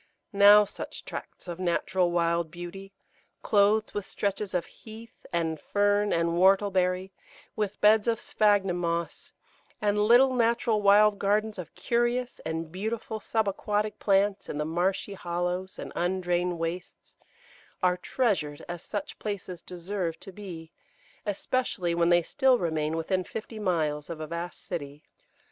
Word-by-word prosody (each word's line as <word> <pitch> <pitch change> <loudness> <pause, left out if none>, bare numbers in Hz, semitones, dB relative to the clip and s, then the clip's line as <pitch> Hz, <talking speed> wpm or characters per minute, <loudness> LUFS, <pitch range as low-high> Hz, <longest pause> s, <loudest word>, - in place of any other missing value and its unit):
Now 205 +1 +8
such 205 - -8
tracts - - -8
of 175 0 -6
natural 180 0 +1
wild 170 -1 +1
beauty, 175 +3 -8 0.5
clothed 210 +1 +3
with 205 - -2
stretches 200 0 -3
of 175 -1 0
Heath 225 +1 -13
and 160 -2 -1
Fern 205 0 +2
and 170 0 +2
Whortleberry, 185 +1 +2 0.4
with 210 -2 -2
beds 215 +1 +5
of 230 -1 +1
Sphagnum 200 -4 +2
Moss, 170 -1 -3 0.5
and 210 0 +1
little 255 +3 +6
natural 230 -2 +2
wild 205 +1 +5
gardens 210 +1 0
of 165 -3 -8
curious 240 +1 0
and 160 0 -4
beautiful 220 +3 -4
sub 220 0 0
aquatic 210 +2 -1
plants 195 0 +2
in - - -4
the 150 - -1
marshy 180 +5 -1
hollows 180 +1 -3
and - - -7
undrained 175 0 0
wastes, 165 +2 -6 0.7
are 180 0 +4
treasured 180 - -1
as 175 -1 -6
such 205 -2 -5
places 195 -4 -5
deserve 175 -1 -4
to 195 - -9
be, 175 -5 -9 0.6
especially 200 -4 -1
when 170 0 +2
they 175 0 +5
still 265 - +3
remain 160 -4 -1
within 185 +3 0
fifty 220 +3 -7
miles 155 -7 -1
of 165 -2 -5
a 155 - -4
vast 170 +2 -6
city. 145 -4 -6
190 Hz, 140 wpm, -28 LUFS, 170-210 Hz, 0.7 s, Now